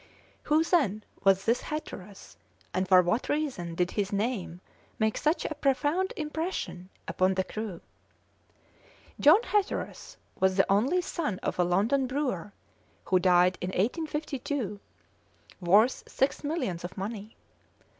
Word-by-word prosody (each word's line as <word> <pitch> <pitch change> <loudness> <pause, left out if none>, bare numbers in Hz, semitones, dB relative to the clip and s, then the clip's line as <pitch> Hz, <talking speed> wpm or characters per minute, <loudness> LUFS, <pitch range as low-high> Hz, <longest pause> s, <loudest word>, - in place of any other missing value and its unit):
Who, 305 +2 +3
then, 265 - +1 0.2
was 195 0 +4
this 230 +2 +2
Hatteras, 210 -10 -7 0.4
and 185 0 0
for 185 -1 +7
what 220 +8 0
reason 255 - -2
did 180 +1 0
his 200 -2 -1
name 200 -4 -2 0.4
make 220 -1 +1
such 310 +3 0
a - - -2
profound 295 +6 +1
impression 305 - -4 0.2
upon 185 +1 +1
the 190 - +1
crew? 210 -3 -6 1.4
John 340 +11 +6
Hatteras 415 -3 -2 0.2
was 190 0 +2
the 195 - +5
only 255 - +3
son 295 - -3
of - - -2
a - - +5
London 215 +10 +2
brewer, 255 - -2 0.5
who 185 - +3
died 180 0 +4
in 180 - -2
1852 270 - -2 0.8
worth 205 +8 +4
six 270 +3 0
millions 265 - -2
of 180 +3 -7
money. 210 +2 -6
215 Hz, 130 wpm, -28 LUFS, 185-295 Hz, 1.4 s, for